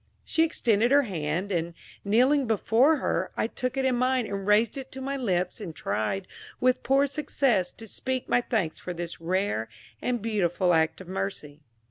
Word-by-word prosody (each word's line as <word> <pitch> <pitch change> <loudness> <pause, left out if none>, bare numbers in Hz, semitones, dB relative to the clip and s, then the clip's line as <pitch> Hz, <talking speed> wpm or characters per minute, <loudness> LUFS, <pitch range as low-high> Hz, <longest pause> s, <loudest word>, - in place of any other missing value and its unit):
She 325 - +2
extended 235 -8 +2
her 285 +1 +5
hand, 175 - -2
and, 170 -1 -2 0.3
kneeling 255 +6 +3
before 225 +7 +3
her, 185 -8 -1
I - - +1
took 255 +3 -3
it 265 - +1
in 255 -2 +2
mine 255 0 +1
and 200 -1 -5
raised 210 +2 +4
it 265 -1 -7
to 265 - -6
my 275 +1 -3
lips, 190 -6 -1
and 170 -6 -6
tried, 110 - -2 0.3
with 255 0 +2
poor 275 +1 +3
success, 270 - 0
to 225 - -9
speak 260 +4 -3
my 245 - +3
thanks 205 -10 -1
for 180 - -6
this 170 0 -6
rare 180 - -1 0.3
and 245 -1 0
beautiful 190 -5 +1
act 160 +1 +1
of 185 - -11
mercy. 185 -6 -4
210 Hz, 180 wpm, -27 LUFS, 180-255 Hz, 0.3 s, her